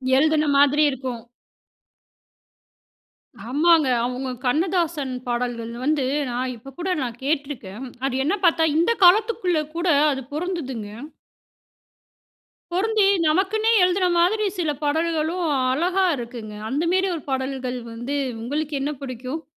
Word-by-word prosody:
எழுதின 310 +2 +3
மாதிரி 285 +2 +5
இருக்கும். 255 -3 -5 2.3
ஆமாங்க. 310 +2 +4 0.2
அவுங்க 255 +1 -3 0.2
கண்ணதாசன் 320 -2 0
பாடல்கள் 240 -1 -2
வந்து, 295 -3 +1 0.2
நான் 250 +1 -2
இப்ப 270 +3 -13
கூட 370 - -2
நான் 240 -2 -4
கேட்டுருக்கேன். 275 -6 -3 0.2
அது 270 - -3
என்ன 355 +7 +2
பார்த்தா, 325 -1 +4
இந்த 340 +7 +3
காலத்துக்குள்ல 370 -3 +4
கூட 345 +2 -1 0.2
அது 270 -1 -3
பொறந்ததுங்க. 295 - -4 1.8
பொருந்தி 425 +3 +2 0.2
நமக்குன்னே 395 +7 +2
எழுதின 365 0 +2
மாதிரி 420 +5 +2
சில 315 -3 +1
பாடல்களும் 320 +3 0 0.3
அழகா 360 +7 +1
இருக்குங்க. 235 -3 -7 0.2
அந்த 285 +6 -1
மேரி 380 0 +2
ஒரு 310 - -7
பாடல்கள் 260 -1 -2
வந்து 240 +5 -4 0.3
உங்களுக்கு 295 +5 -3
என்ன 295 +2 -1
பிடிக்கும்? 255 +4 -5
295 Hz, 115 wpm, -23 LUFS, 255-345 Hz, 2.3 s, மாதிரி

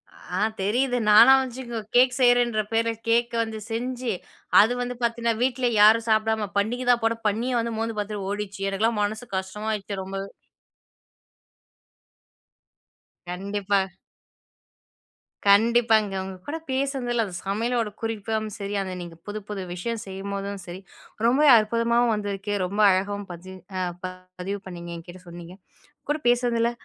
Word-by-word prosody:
அ - - -5 0.2
தெரியுது. 245 +6 +1
நானா 225 +5 +9
வந்துச்சுங் 255 -1 -5 0.2
கேக் 255 +1 +5
செய்றேன்ற 245 -3 +4
பேர்ல 230 0 +2 0.2
கேக் 235 +1 +2
வந்து 220 -1 -6
செஞ்சு, 245 +1 -2 0.5
அது 225 +4 +3
வந்து 245 0 -3
பார்த்தீங்கன்னா, 235 -1 0
வீட்ல 250 -1 +1
யாரும் 225 +2 +6
சாப்பிடாம, 220 -1 +1
பன்னிக 240 +5 0
தான் 235 -1 +2
போட, 225 0 +2
பன்னியே 235 +5 0
வந்து 230 0 -2
மோர்ந்து 225 -1 -3
பார்த்துட்டு 205 -2 -4
ஓடிடுச்சு. 205 -1 -4
எனக்கெல்லாம் 215 +2 0
மனசு 220 +4 -3
கஷ்டமா 210 +3 -4
ஆயிடுச்சு 200 -1 -4
ரொம்பவே. 195 +1 -5 3.0
கண்டிப்பா. 200 +2 -1 1.7
கண்டிப்பாங்க 220 0 +4
உங்க 190 0 -7
கூட 315 +3 -3
பேசுனதுல்ல, 260 -3 0
அந்த 185 -3 -8
சமையலோட 230 +3 0
குறிப்பும் 220 -1 -2
சரி, 200 0 -5
அந்த 185 -1 -4
நீங்க 170 -1 -9
புது 210 +1 -4
புது 195 -2 -4
விஷயம் 225 +5 -4
செய்யும்போதும் 195 +1 -5
சரி. 180 +2 -8 0.4
ரொம்பவே 275 +5 +5
அற்புதமாவும் 230 +2 +2
வந்திருக்கு. 205 0 -3
ரொம்ப 200 +3 -4
அழகாவும் 200 +2 -1
பதிஞ் 185 +2 -10 0.2
அ - - -1 0.6
பதிவு 195 +3 -3
பண்ணிங்க. 175 -1 -8
என்கிட்ட 175 +2 -11
சொன்னீங்க. 170 +1 -10 0.5
கூட 295 - +2
பேசுனதில, 240 -1 +2
220 Hz, 130 wpm, -25 LUFS, 195-235 Hz, 3.0 s, நானா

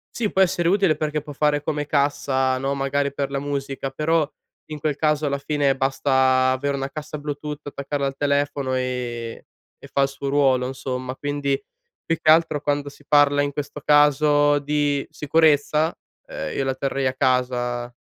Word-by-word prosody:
sì, 220 -4 -1
può 190 - +2
essere 175 -2 0
utile 190 -4 +3
perché 150 0 -2
può 150 - -9
fare 145 0 +1
come 150 -1 -2
cassa, 135 -2 +1
no, 135 +1 -1
magari 140 +1 0
per 140 0 -3
la 140 - -1
musica, 140 -1 -4
però 155 +2 0 0.4
in 155 - -7
quel 150 -1 -1
caso 150 0 +1
alla 140 -1 -1
fine 140 -1 +1
basta 130 -1 +2
avere 140 +2 -1
una 135 0 -3
cassa 150 +1 -6
bluetooth, 150 0 -5
attaccarla 140 0 -3
al 135 - -5
telefono 140 -2 0
e 125 -2 -4 0.3
e - - -12
fa 140 - +1
il - - +3
suo 140 0 -5
ruolo 135 -3 +2
insomma, 130 -1 -5
quindi 145 -1 -1 0.5
più 165 - +1
che - - +2
altro 160 -2 +3
quando 145 -1 -1
si 145 0 -18
parla 145 -1 +4
in 145 0 -1
questo 145 +1 -5
caso 145 0 +4
di 145 -1 0
sicurezza, 155 +1 +2 0.3
uhm, - - -5
io - - 0
la 135 -1 -1
terrei 135 0 -1
a 130 - -1
casa, 125 -1 0
145 Hz, 175 wpm, -23 LUFS, 135-150 Hz, 0.5 s, parla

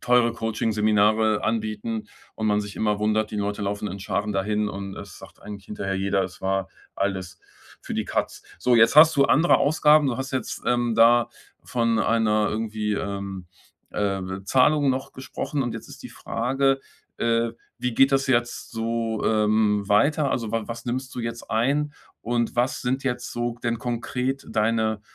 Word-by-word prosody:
teure 120 -1 +3
Coaching-Seminare 110 -1 +1
anbieten 110 0 -2 0.3
und 110 - -2
man 105 0 +2
sich 100 0 -8
immer 105 -1 0
wundert, 110 0 +1
die - - -3
Leute 105 0 -2
laufen 100 +1 -2
in 100 +2 -7
Scharen 105 +2 -2
dahin. 105 +2 0
Und 100 -1 -6
es - - -10
sagt - - -15
eigentlich 100 -2 -9
hinterher 100 -2 -3
jeder, 95 0 +1
es 95 -1 -7
war 95 0 -1 0.3
alles 95 -2 -3 0.4
für - - -7
die - - -1
Katz. - - -2 0.2
So, 125 -1 +3
jetzt 115 +5 +5
hast 160 +1 +9
du 140 -2 +4
andere 160 +5 +4
Ausgaben. 150 0 +4
Du 120 - -1
hast 135 0 -4
jetzt, 130 - -3
ähm, 120 -1 +1
da 120 +1 +5 0.4
von 115 -2 0
einer 110 -1 +2
irgendwie, 110 -1 -2
ähm, 100 -2 -4 0.5
äh, 100 -1 -1 0.2
Zahlung 140 +6 +3
noch 130 0 -1
gesprochen. 135 +2 -4
Und 120 -2 -3
jetzt 115 - -8
ist - - -12
die - - -8
Frage, 135 +3 0 0.4
äh, 115 0 +1 0.3
wie 125 -1 -2
geht 135 +2 +5
das 135 +1 +2
jetzt 120 -2 0
so, 115 -1 -2
ähm, 105 -1 +2
weiter? 140 +7 +3
Also, 115 -3 -2
wa 115 -1 -1
was 115 0 -6
nimmst 130 +1 -3
du - - -2
jetzt 115 0 -6
ein? 140 +6 +1 0.3
Und 120 0 -1
was 125 +2 +1
sind 130 +2 -1
jetzt 125 -2 -3
so 120 0 -2
denn 115 -1 -1
konkret 125 +2 -3
deine 110 -1 0
115 Hz, 175 wpm, -24 LUFS, 105-125 Hz, 0.5 s, hast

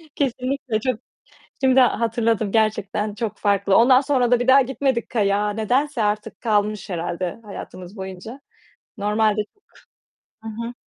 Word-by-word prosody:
Kesinlikle 260 -3 -1
çok 250 -1 -2 0.6
Şimdi 265 0 +5
hatırladım, 230 -4 +1
gerçekten 215 -1 0
çok 220 0 -4
farklı. 200 -1 +2
Ondan 255 +2 +6
sonra 260 -4 +1
da 245 -1 +4
bir 245 - -2
daha 265 +1 +8
gitmedik 265 -1 -1
kayağa, 205 -2 +1
nedense 245 +5 0
artık 210 +1 -2
kalmış 210 -2 0
herhâlde 175 +2 -3
hayatımız 185 -1 -9
boyunca. 190 +6 -8 0.6
Normalde 210 +1 +1
çok 410 - -39 0.8
Hı 225 - -7
hı. 230 +2 -6
220 Hz, 130 wpm, -22 LUFS, 205-250 Hz, 0.8 s, daha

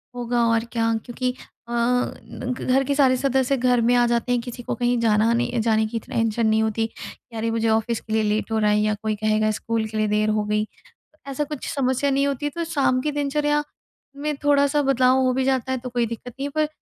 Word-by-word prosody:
होगा 240 -1 0
और 230 0 +1
क्या। 230 -1 +1
क्योंकि 250 +1 -2 0.3
अ, - - -9
घ 250 +1 -2
घर 260 +1 +2
के 280 +1 -1
सारे 265 -3 +4
सदस्य 265 0 +1
घर 250 -1 +2
में 235 +2 +3
आ 245 0 +4
जाते 235 +1 0
हैं 245 - +2
किसी 245 0 -8
को - - -3
कहीं 245 0 +1
जाना 220 0 +3
नहीं 240 0 0
जाने 220 -1 +2
की 230 +1 -3
तो - - -18
टेंशन 225 0 +1
नहीं 220 0 +3
होती। 225 +1 -1 0.5
अरे 225 +1 -1
मुझे 225 0 0
ऑफिस 220 +1 +1
के 220 - -6
लिए 220 0 +2
लेट 215 +1 -1
हो 220 - +1
रहा 210 -1 +3
है 210 - +3
या 215 0 +1
कोई 215 -1 0
कहेगा 215 0 +1
स्कूल 225 -1 -1
के 215 0 -6
लिए 215 0 +1
देर 210 +1 +1
हो 215 0 +1
गई। 210 0 0 0.6
ऐसा 275 +2 -2
कुछ 295 -2 -6
समस्या 265 0 +1
नहीं 275 +1 +2
होती 280 0 -2
है, - - -1
तो 335 +3 -4
शाम 265 -4 +2
की 300 - -1
दिनचर्या 295 +1 0 0.5
में 300 +1 -2
थोड़ा-सा 285 0 +3
बदलाव 260 -1 +3
हो 255 - +2
भी 265 0 0
जाता 260 -1 0
है 260 - -1
तो 250 +1 -7
कोई 240 -1 0
दिक्कत 230 +2 -7
नहीं 275 - -2
है। - - -4
पर 305 -1 +2
240 Hz, 240 wpm, -23 LUFS, 220-265 Hz, 0.6 s, सारे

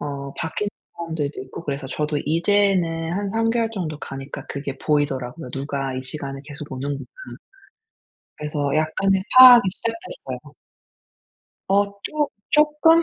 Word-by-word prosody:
어 140 -1 -5
바뀐 160 +6 -2 0.3
사람들도 160 -4 -3 0.2
있고 - - -6
그래서 140 -1 -3
저도 150 +3 -2
이제는 170 -1 +2
한 200 +1 -2
3 225 +1 +1
개월 230 -1 +1
정도 160 -8 -4
가니까 135 +1 -7
그게 140 -1 -4
보이더라고요. 140 -2 -1
'누가 135 -1 -3
이 130 - -3
시간에 135 0 -6
계속 145 -1 -9
오는구나.' 140 +2 -4 1.3
그래서 150 0 -5 0.2
약간의 190 +5 +2 0.2
파악이 250 -2 +11
시작됐어요. 340 - -6 1.1
어 200 +1 +4 0.2
쪼 300 -1 -1 0.2
쪼끔? 300 +2 +5
155 Hz, 290 characters per minute, -23 LUFS, 140-205 Hz, 1.3 s, 파악이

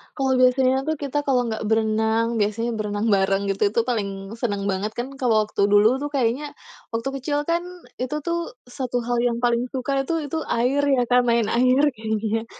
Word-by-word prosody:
Kalau 265 -2 +1
biasanya 260 +1 +3
tuh 315 - +1
kita 285 0 -4
kalau 255 -2 +3
nggak 220 0 -4
berenang, 220 +1 +1
biasanya 215 +3 0
berenang 210 +1 -2
bareng 195 0 +2
gitu, 195 +1 +1
itu - - +2
paling 200 -3 -3
seneng 205 -4 -2
banget, 195 +3 -2
kan 240 +3 -4
kalau 225 -4 +3
waktu 200 -1 0
dulu 215 +5 +5
tuh 290 - -3
kayaknya, 275 +3 -1 0.4
waktu 230 +4 -2
kecil 290 +2 -1
kan 340 +1 +1 0.4
itu 255 +4 -2
tuh 340 -3 -3 0.2
satu 245 -2 -3
hal 240 0 -1
yang 240 -1 +1
paling 240 0 +2
suka 270 +1 -1
itu 320 -3 -2
itu 320 - -2
air 255 +5 +1
ya 245 - +2
kan, 250 0 +5
main 235 -2 +2
air 255 +3 +3
kayaknya. 220 +1 -2
240 Hz, 185 wpm, -23 LUFS, 215-265 Hz, 0.4 s, dulu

